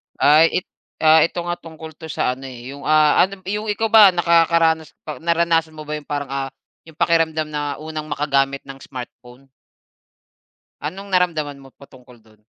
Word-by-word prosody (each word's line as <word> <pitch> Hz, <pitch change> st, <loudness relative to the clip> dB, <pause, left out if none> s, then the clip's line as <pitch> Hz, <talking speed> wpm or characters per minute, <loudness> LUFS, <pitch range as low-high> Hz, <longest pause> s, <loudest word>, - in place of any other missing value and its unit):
Ay 160 Hz, +5 st, +4 dB
it -, -, -57 dB, 0.6 s
ito 175 Hz, -, -6 dB
nga, 175 Hz, -, -1 dB
tungkol 160 Hz, -1 st, -11 dB
'to 160 Hz, +1 st, -11 dB
sa 125 Hz, -, 0 dB
ano 135 Hz, +1 st, -10 dB
eh, 125 Hz, +1 st, -9 dB
yung, 140 Hz, -, -11 dB
ah, 155 Hz, -1 st, +4 dB
ano, 195 Hz, +2 st, 0 dB
yung 210 Hz, +3 st, -3 dB
ikaw 215 Hz, +2 st, -1 dB
ba 215 Hz, -3 st, +9 dB
nakakaranas 165 Hz, -2 st, +2 dB, 0.3 s
naranasan 165 Hz, -1 st, +1 dB
mo 155 Hz, -, -7 dB
ba 150 Hz, -, -5 dB
yung 150 Hz, -1 st, -6 dB
parang, 145 Hz, -2 st, -3 dB
ah, 135 Hz, 0 st, -3 dB, 0.4 s
yung 160 Hz, -, -18 dB
pakiramdam 160 Hz, -2 st, +1 dB
na 145 Hz, -1 st, -3 dB
unang 155 Hz, 0 st, -7 dB
makagamit 140 Hz, -1 st, 0 dB
ng 135 Hz, 0 st, -11 dB
smartphone? 125 Hz, 0 st, -11 dB, 1.3 s
Anong 190 Hz, +7 st, -6 dB
naramdaman 165 Hz, -6 st, 0 dB
mo 135 Hz, -1 st, -15 dB
patungkol 125 Hz, -3 st, -18 dB
do'n? 110 Hz, -1 st, -25 dB
155 Hz, 165 wpm, -20 LUFS, 140-170 Hz, 1.3 s, ba